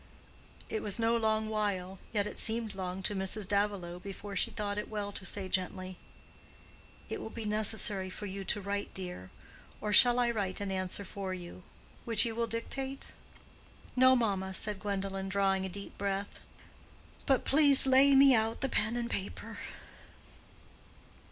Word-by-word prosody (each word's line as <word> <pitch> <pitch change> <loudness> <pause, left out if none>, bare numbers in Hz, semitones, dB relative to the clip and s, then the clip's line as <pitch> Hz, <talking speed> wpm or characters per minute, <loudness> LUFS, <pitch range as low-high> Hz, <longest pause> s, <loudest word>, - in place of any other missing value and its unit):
It 220 - -3
was 205 - -1
no 230 0 +2
long 220 -1 +1
while—yet 205 -1 -2
it - - -6
seemed 225 -1 0
long 185 0 -5
to 205 - +1
Mrs. 190 +1 0
Davilow, 200 -4 -1
before 200 +1 -8
she - - +2
thought 205 0 -3
it - - -6
well 205 -2 -4
to 195 -1 -6
say, 195 -2 -2
gently, 185 0 -3 1.1
"It - - -5
will - - -6
be 225 -1 -6
necessary 210 -2 +2
for 205 - -7
you 195 0 -5
to 205 - 0
write, 200 +1 -3
dear. 180 - -6 0.5
Or 210 0 -2
shall 245 +4 +7
I 240 -1 +2
write 200 -5 -2
an 200 -1 -3
answer 185 +1 -3
for 190 -1 -5
you—which 185 +6 0
you 230 - -2
will 230 +1 -1
dictate?" 265 +4 -4 0.9
"No, 260 0 +6
mamma," 195 -5 -1
said 210 -1 -1
Gwendolen, 195 -1 -3
drawing 195 -1 +1
a - - -7
deep 200 +2 -6
breath. 200 0 -3 0.9
"But 270 -3 +2
please 280 -2 +6
lay 270 +1 +6
me 270 0 +7
out 225 -1 +1
the 270 - 0
pen 220 0 0
and 240 -1 -2
paper." 200 -4 -5
205 Hz, 160 wpm, -31 LUFS, 190-225 Hz, 1.1 s, shall